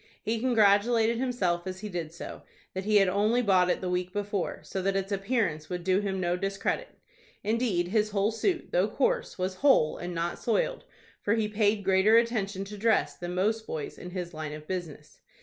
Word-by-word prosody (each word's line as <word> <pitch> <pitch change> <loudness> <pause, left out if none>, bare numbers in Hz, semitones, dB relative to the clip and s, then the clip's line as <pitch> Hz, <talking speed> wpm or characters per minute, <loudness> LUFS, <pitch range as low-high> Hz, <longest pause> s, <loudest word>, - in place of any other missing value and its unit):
He 225 +1 -1
congratulated 225 0 +3
himself, 190 -9 0
as 185 0 -5
he 215 - -4
did 170 -5 -4
so, 170 - -8 0.3
that 190 +1 -4
he 215 0 +2
had 195 -2 +6
only 210 +6 +2
bought 185 -4 +4
it - - 0
the 185 - -3
week 180 0 -1
before, 205 -2 -3
so 190 - -4
that 195 +1 0
its 195 +1 -2
appearance 195 -7 -1
would 180 -1 -4
do 185 +1 +3
him 195 -2 -2
no 175 -1 +1
discredit 195 +2 -2 0.5
Indeed 215 -6 0
his 215 +1 +2
whole 205 +1 +1
suit, 340 - -1
though - - +3
coarse, - - 0
was 185 0 -2
whole, 270 - +4
and 175 0 -5
not 170 +1 -2
soiled, 240 - 0 0.4
for 205 - +1
he 220 -2 +1
paid 210 -1 +1
greater 195 +4 +5
attention 210 -4 0
to 205 +1 -9
dress 225 +1 +2
than 175 0 -5
most 220 +4 0
boys 155 -2 -5
in 180 - -7
his 180 -1 -5
line 155 -1 -5
of 155 0 -9
business. 175 -5 -6
195 Hz, 200 wpm, -28 LUFS, 180-220 Hz, 0.5 s, had